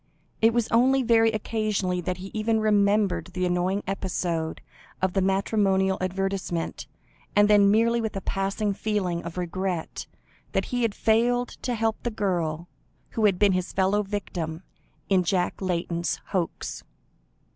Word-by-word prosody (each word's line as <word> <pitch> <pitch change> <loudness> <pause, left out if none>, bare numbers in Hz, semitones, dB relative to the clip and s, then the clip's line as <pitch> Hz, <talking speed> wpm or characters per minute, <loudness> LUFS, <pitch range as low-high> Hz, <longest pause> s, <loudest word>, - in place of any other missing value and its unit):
It 225 +1 +6
was 235 -1 +1
only 260 +3 +4
very 225 -1 +4
occasionally 210 -4 -1
that 180 +1 -3
he 190 +1 -8
even 220 +1 +1
remembered 205 -4 +2
the 185 0 0
annoying 180 +3 0
episode 175 -4 -2 0.4
of 190 -1 0
the 195 - +2
matrimonial 190 0 +2
advertisement, 185 -2 -2 0.5
and 205 0 +6
then 205 -1 +6
merely 230 +3 +3
with 220 -3 -3
a 195 - -3
passing 200 +2 -1
feeling 195 -4 -1
of 170 +1 -8
regret, 180 -1 -3 0.5
that - - +1
he 245 - +1
had 230 -3 0
failed 245 +2 +2
to 245 - -1
help 225 -1 -1
the 240 - -1
girl 175 -6 -2 0.4
who 220 - +1
had 195 -3 +4
been 205 0 +4
his 185 -1 -1
fellow 195 +2 +2
victim 180 -5 -4 0.4
in 190 -2 +3
Jack 180 0 0
Layton's 170 -2 -1
hoax. 180 -4 -3
195 Hz, 145 wpm, -26 LUFS, 180-215 Hz, 0.5 s, It